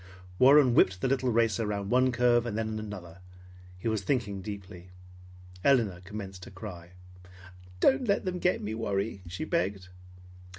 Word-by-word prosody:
Warren 135 -1 +7
whipped 95 -4 +3
the - - +1
little 130 -1 +1
racer 115 -2 +1
round 100 -1 -3
one 130 +1 +4
curve 120 0 +3
and 110 -2 -3
then 110 -1 -2
another. 95 -5 -8 0.6
He 90 - -5
was 110 -2 0
thinking 100 -3 -1
deeply. 95 -3 -9 0.7
Elinor 115 -10 +2
commenced 95 -1 -8
to - - -10
cry. 90 -3 -10 0.9
"Don't 260 - +3
let 200 - +1
them 180 -1 -2
get 180 - +1
me, 105 +1 -3
Warry!" 100 -2 -2
she 90 - -5
begged. 100 - -2
105 Hz, 155 wpm, -29 LUFS, 95-125 Hz, 0.9 s, Warren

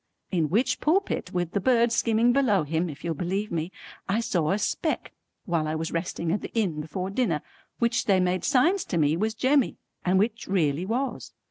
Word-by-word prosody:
In 165 -5 +1
which 240 - +1
pulpit 335 - 0
with 175 -2 -1
the 200 - 0
birds 235 +2 +3
skimming 230 +1 +3
below 240 - +3
him 160 +3 -1
if 145 - -9
you'll 170 -1 -1
believe 190 +6 -2
me, 165 +1 -2 0.4
I 205 +4 +2
saw 180 -10 0
a 195 - +2
speck 305 +9 -1 0.3
while 165 -3 0
I 155 - -1
was 160 +1 -3
resting 170 -1 -2
at 200 - 0
the - - -7
inn 180 -9 0
before 180 +5 -4
dinner 195 - 0 0.3
which 235 +1 +1
they 195 -2 +4
made 180 0 +1
signs 325 +8 +3
to 175 - -2
me 150 -1 +3
was 220 +5 -1
Jemmy 265 +2 +2 0.3
and 185 +1 +2
which 220 +3 0
really 170 -2 +1
was. 255 +5 -3
190 Hz, 200 wpm, -26 LUFS, 165-235 Hz, 0.4 s, they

